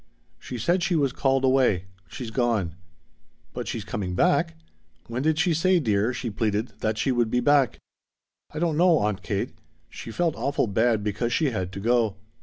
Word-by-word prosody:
"She 125 - -7
said 175 - +1
she 175 0 +1
was 140 -5 +1
called 135 -1 +1
away. 130 -9 +3 0.2
She's 115 +7 -7
gone." 110 -8 0 0.8
"But - - -5
she's 110 -3 -4
coming 100 -5 -3
back? 80 -2 +2 0.5
When 120 +2 -4
did 155 +2 +1
she 175 +1 +2
say, 180 +3 +3
dear," 110 -4 +1
she 120 -2 -4
pleaded, 105 +2 -1
"that 110 0 -1
she 130 - +1
would 120 -2 +1
be 125 - +1
back?" 135 -1 +3 0.7
"I - - -8
don't 160 -1 0
know, 175 -1 +5
Aunt 105 -4 -1
Kate. - - -2 0.4
She - - -8
felt 165 +7 0
awful 140 -2 0
bad 110 +1 +1
because 105 +3 -1
she 140 +2 +1
had 95 -5 -3
to 100 - -5
go. 115 -1 +2
120 Hz, 185 wpm, -25 LUFS, 105-145 Hz, 0.8 s, know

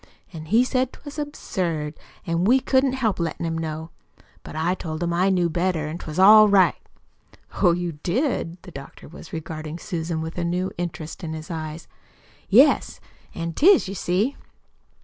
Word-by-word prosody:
An' 155 -2 -8
he 225 +9 +4
said 255 0 0
'twas 290 +1 -10
absurd, 170 - -3 0.3
an' 170 0 0
we 245 +7 +5
couldn't 260 0 +2
help 230 -8 0
lettin' 170 0 -2
him 165 0 -2
know. 160 0 -5 0.5
But - - -10
I 165 +3 +1
told 160 -2 -5
him 170 0 -1
I 180 +3 +2
knew 180 -2 +2
better 170 -2 -1
an' 160 +3 -5
'twas 155 -1 -7
all 215 +3 +8
right." 195 -2 +5 0.9
"Oh, 180 - +6
you 170 -3 -4
did!" 195 - -1
The 185 - -11
doctor 140 -3 -11
was 165 +1 -12
regarding 155 0 -6
Susan 165 -1 -4
with 160 +2 -5
a - - -1
new 180 +2 -1
interest 170 -1 -6
in 160 -1 -4
his 155 +1 -7
eyes. 155 0 -6 0.6
"Yes, - - +4 0.4
an' 165 0 -4
'tis, 355 - +5
you 195 - -5
see." 200 +8 0
175 Hz, 170 wpm, -23 LUFS, 160-195 Hz, 0.9 s, all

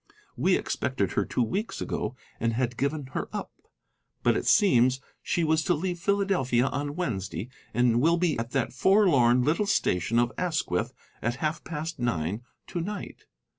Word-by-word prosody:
We - - +3
expected - - -1
her - - 0
two 125 - 0
weeks 200 - -3
ago, 110 +4 -3 0.2
and 115 0 0
had 120 0 -1
given 140 +2 -2
her - - -3
up. - - -5 0.7
But - - +4
it - - -2
seems 130 - +5 0.2
she 170 - 0
was 160 0 +2
to 175 - +3
leave 175 +2 -3
Philadelphia 180 -11 +2
on 145 +2 -2
Wednesday, 110 - -3 0.2
and 120 0 +3
will 165 +4 +4
be 170 -3 +1
at 115 0 -3
that 130 -2 -1
forlorn 130 - +4
little 165 +9 +1
station 110 - +1
of 120 0 +3
Asquith 160 - -1 0.3
at 120 +1 0
half 155 +3 -2
past 160 -1 -5
nine 100 -3 -1 0.2
to 175 - -4
night. 205 +4 -6
140 Hz, 165 wpm, -27 LUFS, 120-170 Hz, 0.7 s, seems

